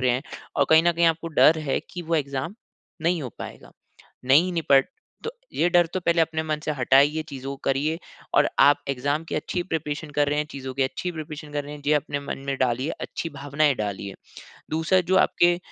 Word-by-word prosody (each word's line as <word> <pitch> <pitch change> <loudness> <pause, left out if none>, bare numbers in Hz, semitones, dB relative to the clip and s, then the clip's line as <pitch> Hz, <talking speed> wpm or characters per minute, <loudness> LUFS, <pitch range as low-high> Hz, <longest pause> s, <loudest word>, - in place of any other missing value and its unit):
रहे 125 -1 +3
हैं। 125 +3 0 0.3
और 140 - +4
कहीं 160 +1 +7
न 175 0 +3
कहीं 170 0 +3
आपको 165 0 +1
डर 160 +1 +5
है 150 -3 -1
कि 175 -1 -6
वो 165 0 -1
एग्ज़ाम 140 +4 -2 0.5
नहीं 170 0 +1
हो 125 - -4
पाएगा, - - -9 0.5
नहीं 155 +8 +4
निपट 140 -5 +3 0.4
तो 455 - -2 0.2
ये 175 - +2
डर 175 -1 +5
तो 185 - 0
पहले 170 -1 +2
अपने 160 0 -1
मन 155 -1 -2
से - - -1
हटाइए, 140 +4 +3
चीज़ों 135 -1 -6
को 140 - -5
करिए। 145 +4 0 0.4
और - - +5
आप 145 +1 +6
एग्ज़ाम 145 +4 -1
की - - -4
अच्छी 175 +4 -2
प्रिपरेशन 155 -3 -4
कर 145 0 +1
रहे 145 - 0
हैं, 150 - 0
चीज़ों 130 -2 -6
की 135 - +1
अच्छी 130 +7 -2
प्रिपरेशन 155 -1 -8
कर 145 -1 -2
रहे 145 - -8
हैं, 145 - -11
ये 150 - +4
अपने 145 -1 -1
मन 140 - -5
में 135 -1 -1
डालिए, 130 +4 0
अच्छी 165 - -4
भावनाएँ 145 0 +1
डालिए। 100 -2 -4 0.6
दूसरा 160 +4 +2
जो 185 +2 +1
आपके 175 -1 +4
150 Hz, 215 wpm, -25 LUFS, 140-165 Hz, 0.6 s, कहीं